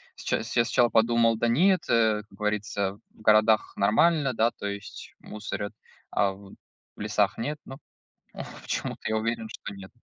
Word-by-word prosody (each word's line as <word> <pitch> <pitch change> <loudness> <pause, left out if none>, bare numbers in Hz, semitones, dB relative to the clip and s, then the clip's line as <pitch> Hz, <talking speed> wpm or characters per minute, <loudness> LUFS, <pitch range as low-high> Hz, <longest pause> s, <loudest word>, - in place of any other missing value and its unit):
сча - - -1
я - - -4 0.2
сначала 120 0 +3
подумал: 115 0 +3
"Да 120 - +1
нет, 175 +9 +4
э, 110 -2 +3
как 100 - -18
говорится, 105 -1 -2
в - - -20
городах 110 0 +4
нормально, 135 +7 +3
да 115 +1 +2
то 100 - -6
есть 100 0 -7
мусорят, 105 -1 -6 0.4
а 100 - +2
в 95 0 -14 0.4
лесах 105 -1 0
нет". 145 +6 -3
Но 135 - -9 0.9
почему-то - - -3
я 110 - 0
уверен, 115 0 -2
что 100 - -8
нет. 95 -1 -11
110 Hz, 155 wpm, -27 LUFS, 105-115 Hz, 0.9 s, нет